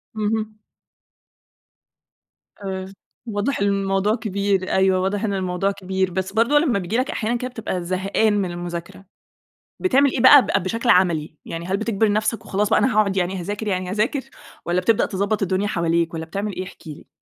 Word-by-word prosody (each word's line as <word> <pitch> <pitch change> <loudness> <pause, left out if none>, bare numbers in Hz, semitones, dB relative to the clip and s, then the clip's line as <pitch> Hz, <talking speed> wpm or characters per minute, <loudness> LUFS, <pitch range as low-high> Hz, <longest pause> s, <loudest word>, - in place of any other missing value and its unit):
اهم. 215 0 -2 2.1
آآ، 190 0 -5 0.3
واضح 225 +4 -2
إن 200 - +2
الموضوع 195 +1 +1
كبير، 200 -4 -1
أيوه. 190 -1 +3
واضح 195 +3 -1
إن 210 -2 0
الموضوع 185 0 -1
كبير، 190 -1 -2
بس 190 +2 -3
برضه 235 +7 +4
لمّا 275 -9 +1
بييجي 190 +5 -2
لك 255 +1 0
أحيانًا 230 +2 -1
كده 255 +1 -4
بتبقى 220 -7 -4
زهقان 195 +4 +1
من 195 -3 0
المذاكرة، 175 +2 -7 0.7
بتعمل 280 -6 +3
إيه - - -2
بقى 285 +3 +9 0.2
ب - - -7
بشكل 230 +6 -2
عَملي، 170 -6 +3
يعني 165 0 -6
هل 190 +2 -1
بتجبر 220 0 +1
نفسك 215 +2 -1
وخلاص 205 +1 0
بقى - - +4
أنا 260 - +2
هاقعد 205 -2 +2
يعني 185 +1 -1
هاذاكر، 205 +5 -4
يعني 185 -2 -1
هاذاكر 215 +8 0 0.4
والّا 175 +1 +1
بتبدأ 220 +3 +2
تضبّط 200 +2 -1
الدنيا 195 +1 0
حواليك 170 -2 0
والّا 160 0 -4
بتعمل 200 +5 -4
إيه، 185 - -3
احكِ 185 - -13
لي؟ 150 -2 -10
195 Hz, 175 wpm, -22 LUFS, 185-215 Hz, 2.1 s, بقى